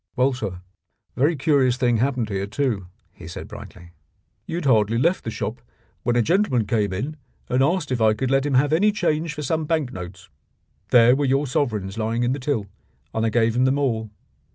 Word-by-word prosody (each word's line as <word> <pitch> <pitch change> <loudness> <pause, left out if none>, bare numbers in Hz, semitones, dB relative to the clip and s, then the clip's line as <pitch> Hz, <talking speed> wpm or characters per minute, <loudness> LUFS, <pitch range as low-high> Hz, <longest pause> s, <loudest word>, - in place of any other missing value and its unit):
"Well, 130 +2 +2
sir, 90 -8 -5 0.5
a - - -10
very 150 +5 +3
curious 135 -4 +2
thing 120 -2 +2
happened 125 -2 0
here 100 -1 -2
too," 110 -6 -2 0.2
he - - -12
said - - -7
brightly. 85 -2 -11 0.6
"You 165 - -4
had 175 - -4
hardly 115 -3 +3
left 170 +9 +1
the - - -4
shop - - -4 0.4
when 120 0 0
a 120 - +3
gentleman 165 - +2
came 105 -2 0
in 135 +12 -4 0.3
and 125 +1 +2
asked 160 +1 +1
if 125 -3 0
I 110 -1 +4
could 130 +4 -2
let 135 +1 +2
him 140 - 0
have 145 +4 +3
any 205 +6 +4
change 165 -5 -1
for 150 - -5
some 155 +3 -1
bank 150 -5 -1
notes. 95 0 -9 0.6
There 120 +1 +6
were 145 +1 0
your 135 +2 +2
sovereigns 110 -7 -2
lying 115 +2 -1
in 120 - +1
the 140 - -4
till, 125 -6 -1 0.5
and 110 - -1
I - - +2
gave 115 0 +2
him 125 +1 +3
them 130 +2 +2
all. 115 -6 -1
125 Hz, 210 wpm, -23 LUFS, 110-145 Hz, 0.6 s, There